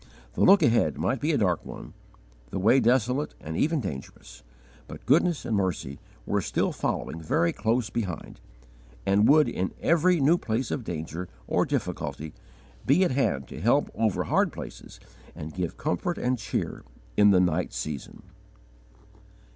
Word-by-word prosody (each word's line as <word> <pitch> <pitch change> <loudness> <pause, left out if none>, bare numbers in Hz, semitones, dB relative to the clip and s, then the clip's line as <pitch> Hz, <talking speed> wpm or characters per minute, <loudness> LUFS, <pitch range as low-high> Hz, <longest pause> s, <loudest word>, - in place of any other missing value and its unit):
The - - -3
look 195 0 +7
ahead 120 0 +3
might 130 - 0
be 155 +3 +1
a 145 - +2
dark 90 -6 +1
one, - - -9 0.6
the - - -4
way 110 +8 +4
desolate 125 +4 +1
and 80 +1 -6
even 155 - +1
dangerous, 75 - -8 0.5
but - - -10
goodness 165 +3 +2
and 115 - 0
mercy 90 -8 -2 0.3
were - - 0
still - - 0
following 80 - -3
very 160 - +1
close 115 -2 0
behind, 95 -8 -5 0.6
and 100 +2 +4
would 150 +1 +6
in 95 +1 -3
every 170 +1 +3
new 155 +5 +4
place 115 +2 -2
of 130 - -2
danger 85 -1 -5 0.2
or - - +1
difficulty 80 0 -3 0.5
be 150 +8 +4
at 180 - +1
hand 70 - 0
to - - -8
help - - +2
over 110 -3 0
hard - - +1
places - - -10 0.4
and 80 -1 -7
give 90 -2 -4
comfort 175 - -2
and 125 0 -1
cheer - - -3 0.3
in 105 0 +6
the 95 -2 +5
night 90 -1 +1
season. 75 -3 -6
110 Hz, 155 wpm, -26 LUFS, 90-140 Hz, 0.6 s, look